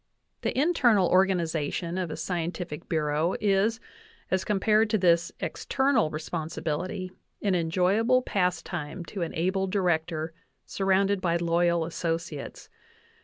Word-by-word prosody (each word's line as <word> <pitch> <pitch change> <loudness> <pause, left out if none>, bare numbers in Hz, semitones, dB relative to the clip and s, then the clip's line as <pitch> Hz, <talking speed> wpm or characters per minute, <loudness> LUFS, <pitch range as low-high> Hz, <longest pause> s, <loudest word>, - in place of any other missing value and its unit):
The - - -2
internal 245 - +4
organization 175 -2 +1
of 180 -3 -2
a 155 - -5
scientific 175 -2 -4
bureau 155 +1 +1
is, 210 +2 +2 0.5
as 190 0 +1
com 210 -2 0
pared 215 +2 +3
to 215 - +2
this 170 -3 +3
external 265 - +1
responsibility, 160 +4 -4 0.3
an 200 -2 +2
enjoyable 190 +9 +2
pastime 175 -4 -2
to 195 - -6
an 170 - -3
able 190 +3 0
Director 165 -4 0 0.3
surrounded 195 0 +1
by 170 -2 +1
loyal 170 0 +2
associates. 165 -3 -4
180 Hz, 120 wpm, -27 LUFS, 165-195 Hz, 0.5 s, internal